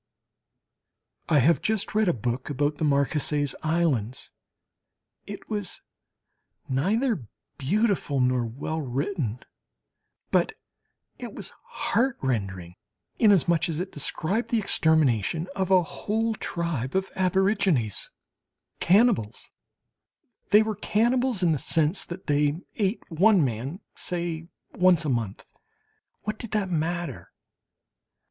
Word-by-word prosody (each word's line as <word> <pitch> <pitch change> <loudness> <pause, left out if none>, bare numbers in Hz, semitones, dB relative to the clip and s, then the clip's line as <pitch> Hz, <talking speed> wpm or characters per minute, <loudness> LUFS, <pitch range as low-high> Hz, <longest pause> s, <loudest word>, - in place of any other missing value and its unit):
I 155 - +4
have 150 +5 +4
just 220 -2 -1
read 215 -1 +2
a 175 - +3
book 120 +2 -2
about 145 +1 -1
the - - -1
Marquesas 145 0 +1
Islands. 150 -8 0 1.0
It - - -8
was 205 -4 -3 0.8
neither 195 - 0 0.3
beautiful 190 - +1
nor 125 -1 +2
well 140 +7 -4
written, 135 - -2 0.9
but - - +2 0.7
it - - -7
was - - -7
heartrending 110 - -1 0.4
inasmuch 175 -6 +4
as 160 -1 -2
it 185 +2 -4
described 175 - -2
the 235 - +2
extermination 160 - +2
of 190 -1 -1
a 185 -2 +5
whole 215 +10 -2
tribe 170 - -3
of 190 0 0
aborigines 185 - +1 0.7
cannibals! 190 - +2 1.0
They 210 +1 +7
were 215 -2 -3
cannibals 240 -1 +1
in 170 - +4
the 150 - 0
sense 160 +6 0
that 180 +2 -8
they 145 +1 +2 0.2
ate 200 +1 -1
one 185 0 +4
man, 130 - -4
say 170 -2 -3 0.3
once 180 -3 +4
a - - 0
month 115 -6 -2 0.8
(what 215 0 -4
did 230 - -5
that 200 -3 0
matter?) 170 -3 -2
165 Hz, 110 wpm, -26 LUFS, 140-200 Hz, 1.0 s, They